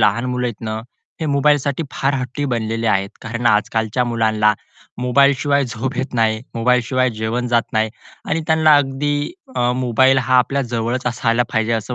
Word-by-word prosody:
लहान 105 +3 +2
मुलं 125 0 -1
आहेत 120 -3 -6
ना, 110 0 -3 0.4
हे 160 - -1
मोबाईलसाठी 145 0 +1
फार 135 +1 0
हट्टी 130 +2 -3
बनलेले 115 -3 -2
आहेत, 100 -2 +1
कारण 115 +2 -3
आजकालच्या 110 +2 +1
मुलांना 110 -2 +2 0.5
मोबाईलशिवाय 140 +2 +3
झोप 125 +2 -4
येत 130 +2 -3
नाही 110 -2 +1
मोबाईलशिवाय 125 +2 +1
जेवण 115 +3 -2
जात 120 -1 +3
नाही 110 0 +1 0.4
आणि 160 - 0
त्यांना 160 -1 +5
अगदी 145 +1 0 0.7
मोबाईल 130 +2 +4
हा 130 - +4
आपल्या 135 +3 +1
जवळच 120 +2 -2
असायला 120 0 +1
पाहिजे 110 0 +1
असं 115 +2 -2
125 Hz, 155 wpm, -19 LUFS, 115-135 Hz, 0.7 s, त्यांना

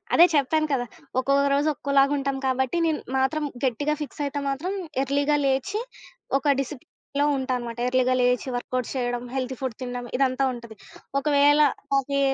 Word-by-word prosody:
అదే 345 - +9
చెప్పాను 310 +3 +2
కదా! 245 -2 0 0.3
ఒక్కొక్క 275 +2 +2
రోజు 290 +2 +1
ఒక్కోలాగా 280 +1 +2
ఉంటాం 275 -1 -2
కాబట్టి 260 +4 0
నేను 315 - 0 0.2
మాత్రం 295 +3 +1 0.2
గట్టిగా 290 +5 0
ఫిక్స్ 295 - -8
అయితే 285 +1 -3
మాత్రం 325 +8 -2 0.3
ఎర్లీ‌గా 285 +2 +1
లేచి 275 +11 0 0.6
ఒక 275 - -8
డిసిప్లేన్‌లో 280 +1 -4
ఉంటానమాట. 250 -3 -3
ఎర్లీగా 255 0 +2
లేచి 250 +1 +2
వర్కౌట్స్ 250 0 -3
చేయడం 245 -1 -1
హెల్దీ 260 0 -2
ఫుడ్ 260 -4 -3
తినడం 245 -1 -4
ఇదంతా 265 0 +1
ఉంటది. 235 -2 -10 0.4
ఒకవేళ 290 +1 +4 0.3
నాకీ 280 +1 +1
270 Hz, 145 wpm, -25 LUFS, 255-285 Hz, 0.6 s, అదే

